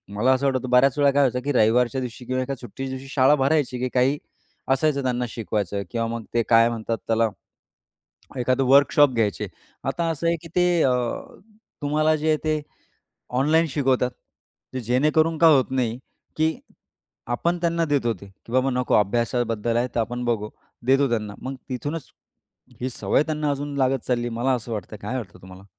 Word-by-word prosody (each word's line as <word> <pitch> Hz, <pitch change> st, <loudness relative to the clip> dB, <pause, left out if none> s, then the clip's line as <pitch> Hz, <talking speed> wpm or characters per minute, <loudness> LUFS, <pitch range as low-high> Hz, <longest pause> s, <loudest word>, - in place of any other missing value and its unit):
मला 120 Hz, +6 st, +3 dB
असं 130 Hz, +2 st, 0 dB
वाटतं, 130 Hz, -2 st, 0 dB
बऱ्याच 125 Hz, +2 st, +4 dB
वेळा 145 Hz, -1 st, +4 dB
काय 145 Hz, +1 st, +3 dB
व्हायचं 125 Hz, -2 st, +2 dB
की 145 Hz, -, +1 dB
रविवारच्या 125 Hz, +2 st, +3 dB
दिवशी 125 Hz, 0 st, -7 dB
किंवा 130 Hz, +1 st, -1 dB
एका 135 Hz, +2 st, -3 dB
सुट्टीच्या 130 Hz, +2 st, -7 dB
दिवशी 135 Hz, +1 st, -11 dB
शाळा 135 Hz, +2 st, +5 dB
भरायची, 140 Hz, -2 st, +1 dB
की 130 Hz, -, 0 dB
काही 130 Hz, +3 st, +3 dB, 0.6 s
असायचं 140 Hz, 0 st, +1 dB
त्यांना 125 Hz, -1 st, 0 dB
शिकवायचं 105 Hz, -3 st, -3 dB
किंवा 115 Hz, -1 st, -1 dB
मग 115 Hz, 0 st, -4 dB
ते 120 Hz, 0 st, +2 dB
काय 115 Hz, 0 st, +6 dB
म्हणतात 115 Hz, -1 st, -3 dB
त्याला, 115 Hz, 0 st, +2 dB, 1.1 s
एखादं 130 Hz, +2 st, +1 dB
वर्कशॉप 140 Hz, +1 st, +6 dB
घ्यायचे. 110 Hz, -4 st, 0 dB, 0.4 s
आता 170 Hz, -, -1 dB
असं 165 Hz, +1 st, -3 dB
आहे, 170 Hz, 0 st, +2 dB
की 165 Hz, -, -10 dB
ते 180 Hz, 0 st, +4 dB, 0.2 s
अ, 130 Hz, -, +3 dB, 0.9 s
तुम्हाला 155 Hz, +2 st, +2 dB
जे 155 Hz, +1 st, -2 dB
आहे 155 Hz, -, +4 dB
ते 155 Hz, -1 st, +1 dB, 0.8 s
ऑनलाईन 160 Hz, +4 st, +3 dB
शिकवतात. 130 Hz, -3 st, +1 dB, 0.6 s
ते 130 Hz, -, -2 dB
जेणेकरून 155 Hz, +7 st, +2 dB
का 165 Hz, -, +6 dB
होत 135 Hz, -5 st, +4 dB
नाही, 125 Hz, -3 st, -1 dB, 0.4 s
की 160 Hz, +1 st, +2 dB, 0.7 s
आपण 170 Hz, +9 st, 0 dB
त्यांना 170 Hz, -1 st, +1 dB
देतो, 140 Hz, -6 st, +1 dB
ते 100 Hz, 0 st, -13 dB
की 100 Hz, +4 st, -16 dB
बाबा 130 Hz, +1 st, +2 dB
नको 125 Hz, 0 st, 0 dB
अभ्यासाबद्दल 115 Hz, +1 st, +1 dB
आहे, 120 Hz, +1 st, +1 dB
तर -, -, +1 dB
आपण 120 Hz, +2 st, -3 dB
बघू 110 Hz, -3 st, -1 dB, 0.4 s
देतो 135 Hz, +2 st, +4 dB
त्यांना. 105 Hz, -3 st, -2 dB
मग 135 Hz, +1 st, -4 dB
तिथूनच 145 Hz, +4 st, -5 dB, 0.7 s
ही 130 Hz, -, -1 dB
सवय 130 Hz, -, +1 dB
त्यांना 150 Hz, -1 st, -2 dB
अजून 145 Hz, +1 st, -4 dB
लागत 135 Hz, -1 st, +1 dB
चालली, 120 Hz, -1 st, 0 dB
मला 120 Hz, +3 st, 0 dB
असं 120 Hz, -1 st, -4 dB
वाटतंय 110 Hz, 0 st, -6 dB
काय 115 Hz, +6 st, -3 dB
वाटतं 95 Hz, -7 st, -8 dB
तुम्हाला? 95 Hz, +1 st, -13 dB
130 Hz, 175 wpm, -24 LUFS, 115-145 Hz, 1.1 s, काय